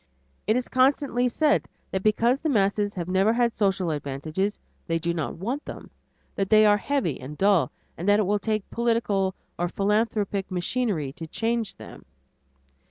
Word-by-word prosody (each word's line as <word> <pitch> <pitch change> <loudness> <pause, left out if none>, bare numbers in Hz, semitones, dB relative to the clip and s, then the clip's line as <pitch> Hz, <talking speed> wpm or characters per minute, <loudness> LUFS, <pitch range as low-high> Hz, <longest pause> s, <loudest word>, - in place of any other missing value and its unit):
It 215 - +3
is 250 0 0
constantly 260 -1 +2
said 295 +5 +2 0.2
that 190 - -1
because 230 +5 +2
the 315 - -1
masses 205 -3 +1
have 175 -2 -4
never 190 +4 +3
had 235 -1 +1
social 190 -4 +1
advantages, 155 +7 -2 0.3
they 165 - +1
do 170 +1 -1
want 190 - -3
them, - - -9 0.4
that 195 -1 -2
they 215 0 +6
are 205 0 +5
heavy 235 - -1
and 140 +4 -8
dull, 190 -9 +3 0.3
and 180 +4 0
that 205 +1 +5
it 210 - +2
will 205 +2 +1
take 215 0 -2
political 225 -5 0 0.2
or 175 - +1
philanthropic 205 0 0
machinery 180 - -1
to 165 +2 -8
change 230 +4 -1
them. - - -12
205 Hz, 165 wpm, -25 LUFS, 180-230 Hz, 0.4 s, they